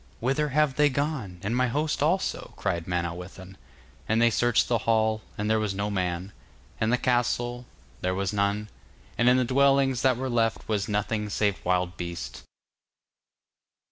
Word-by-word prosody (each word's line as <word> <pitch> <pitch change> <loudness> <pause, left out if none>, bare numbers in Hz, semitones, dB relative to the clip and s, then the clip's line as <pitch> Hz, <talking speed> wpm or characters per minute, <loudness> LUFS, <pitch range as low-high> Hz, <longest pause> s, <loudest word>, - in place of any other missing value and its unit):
'Whither 135 +5 0
have 145 -1 +2
they 150 0 +5
gone, 135 - -2
and 105 +4 -1
my 125 0 +2
host 150 +5 -1
also?' 175 +6 0
cried 85 -1 -2
Manawyddan, 90 +2 -4 0.5
and 110 +1 +3
they 120 0 +5
searched 120 +1 +2
the 120 -2 +1
hall, 110 -1 +2 0.2
and 105 - -2
there 110 0 +2
was 105 -3 -1
no 100 +1 -2
man, 90 0 -2 0.5
and 110 +1 +1
the 125 - +3
castle, 120 -1 0
and 125 - -13 0.4
there 90 0 0
was 100 +1 -1
none, 100 +1 0 0.5
and 120 +1 +4
in 125 - +5
the 130 - +2
dwellings 135 0 +3
that 130 -3 +3
were 130 +1 -3
left 115 -2 0
was 105 -2 -1
nothing 105 0 -1
save 100 -1 0
wild 90 0 0
beasts. 85 -9 -6
110 Hz, 170 wpm, -27 LUFS, 95-125 Hz, 0.5 s, they